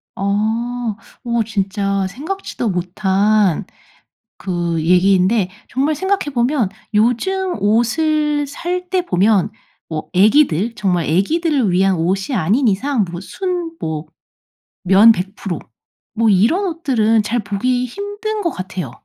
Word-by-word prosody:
어. - - -5 1.0
어 235 -2 0
진짜 200 -2 -1
생각지도 295 - -4
못한 190 +1 +1 0.7
그 175 -3 -2
얘기인데 185 +3 +3 0.2
정말 280 +5 0
생각해 380 -2 -1
보면 240 -2 +1 0.3
요즘 355 - +1
옷을 290 +8 +1
살 355 +5 -4
때 370 -1 +1
보면 205 - +2 0.4
뭐 155 -1 -5
애기들 215 - +3
정말 180 -7 0
애기들을 260 - +1
위한 190 +1 +3
옷이 190 +9 -1
아닌 220 - +2
이상 225 +3 +1
뭐 175 0 -6
순 350 - -4
뭐 160 0 -4 0.8
면 195 +5 +7
100% 195 -2 -3 0.5
뭐 225 +1 +1
이런 225 - +3
옷들은 255 - +1
잘 235 +3 -1
보기 245 +5 -1
힘든 410 - -4
것 345 - 0
같아요 185 -7 -5
220 Hz, 210 characters per minute, -18 LUFS, 190-295 Hz, 1.0 s, 면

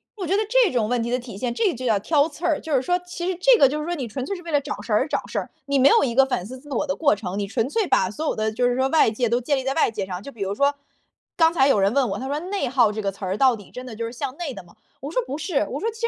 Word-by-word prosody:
我 375 -5 -5
觉 390 - +2
得 430 - +2
这 - - +4
种 230 -4 +1
问 245 -1 +1
题 235 - -3
的 250 - +2
体 235 -5 -9
现， 240 +1 -2
这 395 - +1
就 255 +1 -6
叫 220 - +3
挑 295 +6 +2
刺 320 +3 -8
儿， 320 -4 +2
就 315 - -4
是 255 - +3
说 355 +4 +1
其 355 0 -6
实 370 - -1
这 - - +6
个， 275 - +7
就 300 +2 -3
是 300 - -4
说 350 0 -2
你 260 -6 -4
纯 255 +4 -5
粹 395 - -3
是 355 - -9
为 335 - -7
了 290 - +3
找 - - -5
事 - - -3
儿 - - +5
而 - - 0
找 - - -2
事 - - -2
儿， - - -6 0.2
你 280 -1 +1
没 275 +2 +6
有 - - +5
一 240 -4 0
个 270 - +7
反 250 -9 -2
思 255 +3 -9
自 290 - -16
我 270 - 0
的 280 - -1
过 285 -8 +3
程， 195 -1 -5
你 200 - -2
纯 225 +4 -1
粹 420 +3 0
把 185 - +2
所 310 - -5
有 - - 0
的 215 0 -1
就 245 +3 +1
是 245 - +1
说 260 +1 +2
外 315 -7 +4
界 240 +2 0
都 240 +1 +1
建 280 +3 0
立 260 - -3
在 270 +1 -1
外 320 - +2
界 200 -3 -3
上。 185 0 -6
就 280 - -8
比 225 - -13
如 195 +1 -1
说， 280 +3 +2 0.6
刚 325 -1 +4
才 270 -4 +4
有 215 - +3
人 195 +1 +3
问 270 -3 +3
我， - - -3
他 265 - -5
说： 290 +2 -2
“内 400 -10 -1
耗 240 -4 +3
这 215 +1 -4
个 195 -1 -1
词 195 +1 -8
儿， 185 +1 -1
到 260 -3 +4
底 205 -3 -14
真 250 +1 -8
的 225 - -8
就 230 +1 -4
是 230 - -5
向 260 +1 -5
内 330 -6 -4
的 185 - -9
吗？” 175 - -21 0.3
我 285 +3 -6
说：” - - 0
不 275 - -4
是。 310 - -1
“我 275 - -3
说：” 455 - -1
其 450 +1 -13
实 465 - +2
265 Hz, 395 characters per minute, -23 LUFS, 230-315 Hz, 0.6 s, 个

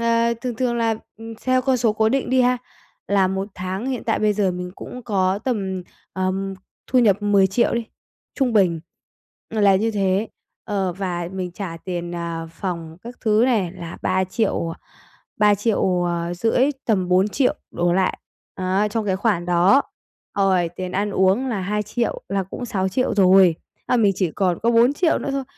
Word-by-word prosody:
Ờ, 230 0 +2
thường 250 -1 -3
thường 245 0 0
là, 230 -1 +1 0.2
ừm, 225 0 -8
theo 255 0 +2
con 265 0 +2
số 230 -3 +2
cố 220 +1 +2
định 265 +1 0
đi 260 0 +4
ha, 250 0 +2 0.5
là 195 -2 +3
một 190 +1 -3
tháng 185 +5 -4
hiện 260 -3 -3
tại - - +1
bây 215 -1 +2
giờ 200 -2 +1
mình 180 0 -5
cũng 250 - -9
có 195 -4 +1
tầm, 195 -7 -2 0.3
ờm, 190 +1 -2 0.3
thu 255 - +2
nhập 210 -4 +3
10.000.000 200 +2 +3
đi, 235 0 -1 0.5
trung 260 -4 +1
bình 180 -6 +3 0.7
là 205 -3 +4
như 220 +4 +1
thế. 200 0 0 0.4
Ờ, 195 -3 -1
và 175 -2 -3
mình 185 -1 -4
trả 180 -3 -6
tiền, 175 -2 -4
ờ, 170 -1 -4
phòng 165 -3 -5
các 240 +2 -9
thứ 215 -1 +3
này 205 -9 +1
là 170 -3 -8
3.000.000, 190 -1 0
à, 165 - -9 0.6
3.500.000, 190 +1 +1 0.2
tầm 190 -6 +1
4.000.000 200 +8 +2 0.2
đổ 175 0 0
lại, 185 +1 +1 0.4
á, 190 +3 0
trong 220 0 -2
cái 190 -2 +1
khoản 195 -5 0
đó. 180 +10 +4 0.6
Rồi 185 -3 +3
tiền 185 -1 -4
ăn 205 +2 0
uống 195 +7 +2
là 220 -6 -2
2.000.000 210 +5 -2
là 195 +1 0
cũng 195 +6 -7
6.000.000 200 +3 0
rồi. 190 -3 +6 0.3
À, - - +2
mình 210 -4 +4
chỉ 185 -4 0
còn 185 -4 0
có 230 - +3
4.000.000 265 +9 +3
nữa - - -3
thôi. 275 0 -2
195 Hz, 175 wpm, -22 LUFS, 185-230 Hz, 0.7 s, rồi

